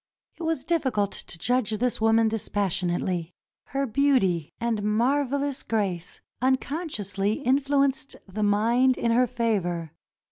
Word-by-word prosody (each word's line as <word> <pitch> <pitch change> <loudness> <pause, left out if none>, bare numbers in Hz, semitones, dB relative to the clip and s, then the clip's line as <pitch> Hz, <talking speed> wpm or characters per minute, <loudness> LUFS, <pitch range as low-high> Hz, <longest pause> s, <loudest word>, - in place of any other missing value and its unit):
It - - -9
was 325 -4 -1
difficult 260 - 0
to - - -5
judge 220 +3 0
this 245 0 -1
woman 225 0 +4
dispassionately. 185 -5 -1 0.3
Her 275 +1 -2
beauty 225 - +2
and 230 -2 -1
marvelous 270 +6 0
grace 190 -6 -2 0.2
unconsciously 260 - -1
influ 275 +2 +3
enced 275 +1 -4
the 200 +3 -5
mind 230 +5 +3
in 235 - +1
her 250 +2 +4
favor. 195 -10 -1
230 Hz, 120 wpm, -26 LUFS, 200-270 Hz, 0.3 s, woman